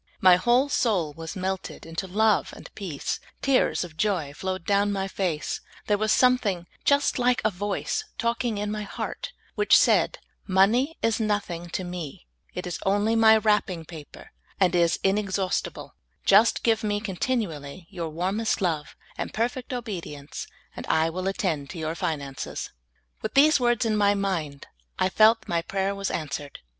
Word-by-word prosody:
My 185 -1 +7
whole 240 +9 +3
soul 195 - +1
was 165 +4 -7
melted 190 0 -4
into 165 +4 -4
love 210 +2 +2
and - - -12
peace; 175 -9 -4 0.2
tears 270 -8 +2
of 165 -3 -10
joy 175 -8 0
flowed 185 +2 -4
down 205 0 +2
my 195 -1 -1
face; 180 -6 -2 0.2
there 205 -1 +1
was 215 0 +1
something 230 -9 +3 0.2
just 285 -2 +2
like 245 0 +3
a 215 - +3
voice 205 - -2
talking 235 -1 -1
in 205 0 -2
my 215 0 -3
heart, 210 - -5 0.2
which 415 - +5
said, - - +3 0.2
" - - -32
Monej 225 +11 +3
is 225 0 +2
nothing 200 -6 -2
to 185 - -3
Me; 175 - -7 0.3
it 180 - -4
is 180 - -4
only 205 +3 +2
My 220 -1 +7
wTapping 210 -6 +1
paper, 155 -4 -11 0.3
and 185 -3 +3
is 170 -1 +3
inexhaust 195 -1 0
ible; - - -10 0.3
just 210 +4 +5
give 225 -1 +2
Me 205 -1 0
continually 185 - -3
your 170 -4 -4
warmest 190 +8 -1
love 160 -6 -2 0.2
and - - -3
perfect 245 +3 -2
obedience, 180 - -6 0.3
and - - -7
I 160 +1 +2
will 185 +3 -3
attend 180 -9 -1
to 175 - -8
3'our 160 0 -3
finances." 140 -5 -4 0.5
With 220 - -4
these 295 +2 +6
words 240 -1 +2
in 220 -1 +1
my 205 -1 +3
mind, 170 -8 -2 0.3
I 185 - +2
felt 220 +3 +5
that - - -21
my 170 -1 0
pra3'er 195 +3 -2
was 200 0 -2
answered. 145 -2 -4
195 Hz, 170 wpm, -26 LUFS, 170-220 Hz, 0.5 s, My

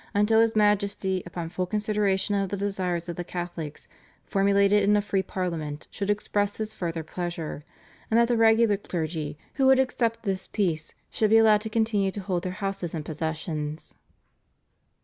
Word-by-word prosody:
until 210 +2 +4
his 225 -1 +2
Majesty 200 -3 +2
upon 170 -1 -5
full 180 +1 -2
consideration 205 -1 0
of 195 -1 0
the 200 - -3
desires 185 -4 -2
of 170 - -5
the 175 - -3
Catholics, 175 -4 -6 0.4
formulated 200 +1 +3
in 205 +1 +4
a - - +4
free 200 -1 0
Parliament, 165 -6 -4
should 200 -1 -3
express 205 0 0
his 220 0 -4
further 165 -5 -3
pleasure; 165 -2 -5 0.5
and 225 - +4
that 235 - +4
the 240 - +2
regular 225 -2 +4
clergy 160 -5 -4 0.2
who 265 - +4
would 265 0 +7
accept 235 -3 0
this 190 -3 -2
peace 165 -7 -1 0.2
should 215 - +1
be 225 - +6
allowed 215 -2 +5
to 220 - -5
continue 215 -3 +1
to 200 +1 -5
hold 185 -2 -1
their 185 0 -3
houses 190 -4 -3
and 155 -2 -4
possessions. 155 -1 -4
195 Hz, 170 wpm, -26 LUFS, 175-210 Hz, 0.5 s, would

